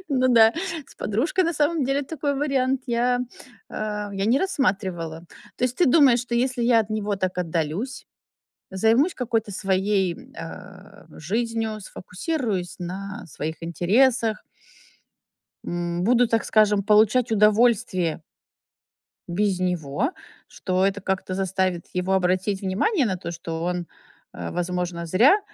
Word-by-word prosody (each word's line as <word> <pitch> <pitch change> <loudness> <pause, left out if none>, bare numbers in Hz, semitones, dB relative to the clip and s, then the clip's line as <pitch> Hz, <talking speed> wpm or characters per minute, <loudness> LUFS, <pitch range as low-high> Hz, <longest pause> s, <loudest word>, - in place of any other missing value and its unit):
Ну 255 -3 +2
да, 225 -2 +6 0.3
с - - -17
подружкой, 280 - 0
на 335 - 0
самом 300 0 +1
деле, 275 +2 0
такой 285 0 -2
вариант 270 -2 0
я, 245 +1 +1 0.5
а, 210 -1 -4
я 195 0 -1
не 240 +5 +4
рассматривала. 185 - -1 0.3
То - - 0
есть 250 0 -1
ты 355 - +3
думаешь, 260 -3 +5
что 245 0 -4
если 250 0 0
я 235 -1 +5
от 215 -1 -5
него 210 -1 -1
так 185 -1 -2
отдалюсь, 175 - -3 0.7
займусь 225 - +3
какой-то 225 -4 -1
своей, 190 -1 0
э, 185 +4 -11
жизнью, 220 +5 -2
сфокусируюсь 195 - -4
на 195 +3 -6
своих 160 +1 -5
интересах 215 - +2 1.2
м, 175 0 -3
буду, 245 +3 +4
так 225 0 +1
скажем, 210 -2 +3
получать 215 +4 +3
удовольствие 210 -6 +2 1.1
Без 190 +1 0
него. 180 - -1 0.4
Что 185 0 0
это 200 +1 -1
как-то 190 -1 -2
заставит 190 -2 -1
его 180 +1 -1
обратить 190 +1 +1
внимание 245 - +1
на 190 - -1
то, 170 -1 -6
что 165 -1 -5
он, 180 0 -2 0.5
э, 85 -1 -6
возможно, 175 -1 -3
зря 240 - +5
205 Hz, 130 wpm, -24 LUFS, 180-245 Hz, 1.2 s, да